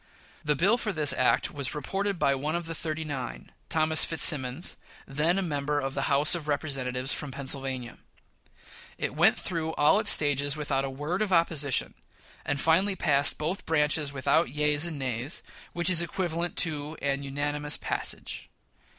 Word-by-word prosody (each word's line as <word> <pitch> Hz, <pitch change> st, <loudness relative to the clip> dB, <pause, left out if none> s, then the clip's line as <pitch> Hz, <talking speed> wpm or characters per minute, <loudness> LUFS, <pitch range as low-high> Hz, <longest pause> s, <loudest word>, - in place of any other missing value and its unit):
The 150 Hz, -1 st, +1 dB
bill 200 Hz, -, +2 dB
for 215 Hz, -, -2 dB
this 150 Hz, -6 st, +1 dB
act 130 Hz, -, +1 dB
was 140 Hz, -2 st, -3 dB
reported 195 Hz, +6 st, -2 dB
by 140 Hz, -, +2 dB
one 150 Hz, +4 st, -2 dB
of 170 Hz, -1 st, -3 dB
the 165 Hz, -, -5 dB
"thirty 160 Hz, 0 st, -4 dB
nine," 135 Hz, -4 st, -6 dB, 0.2 s
Thomas 160 Hz, 0 st, +6 dB
Fitzsimmons, 150 Hz, -1 st, +2 dB, 0.3 s
then 150 Hz, +6 st, 0 dB
a 195 Hz, -, 0 dB
member 145 Hz, -3 st, -2 dB
of 135 Hz, -1 st, -4 dB
the 135 Hz, -, -2 dB
House 140 Hz, +2 st, +4 dB
of 165 Hz, -4 st, -3 dB
Representatives 135 Hz, -3 st, -2 dB
from 150 Hz, -, -5 dB
Pennsylvania. 135 Hz, -2 st, -3 dB, 1.0 s
It -, -, -3 dB
went -, -, +3 dB
through 160 Hz, -2 st, -3 dB
all 150 Hz, +7 st, +4 dB
its 210 Hz, -2 st, 0 dB
stages 145 Hz, 0 st, +4 dB
without 140 Hz, -2 st, -1 dB
a -, -, -4 dB
word 150 Hz, +8 st, -4 dB
of 210 Hz, -2 st, -1 dB
opposition, 160 Hz, -6 st, +1 dB, 0.5 s
and 140 Hz, -1 st, -2 dB
finally 185 Hz, +7 st, +2 dB
passed 140 Hz, -4 st, +3 dB
both 165 Hz, +6 st, -4 dB
branches 150 Hz, -2 st, +1 dB
without 135 Hz, -3 st, +1 dB
yeas 150 Hz, +3 st, +1 dB
and 160 Hz, -3 st, -5 dB
nays, 130 Hz, +1 st, -2 dB, 0.3 s
which 175 Hz, -1 st, -3 dB
is 180 Hz, -2 st, +6 dB
equivalent 170 Hz, 0 st, -3 dB
to 155 Hz, -1 st, -2 dB
a 140 Hz, -1 st, 0 dB
unanimous 145 Hz, +1 st, -2 dB
passage. -, -, -3 dB
150 Hz, 165 wpm, -27 LUFS, 140-165 Hz, 1.0 s, Thomas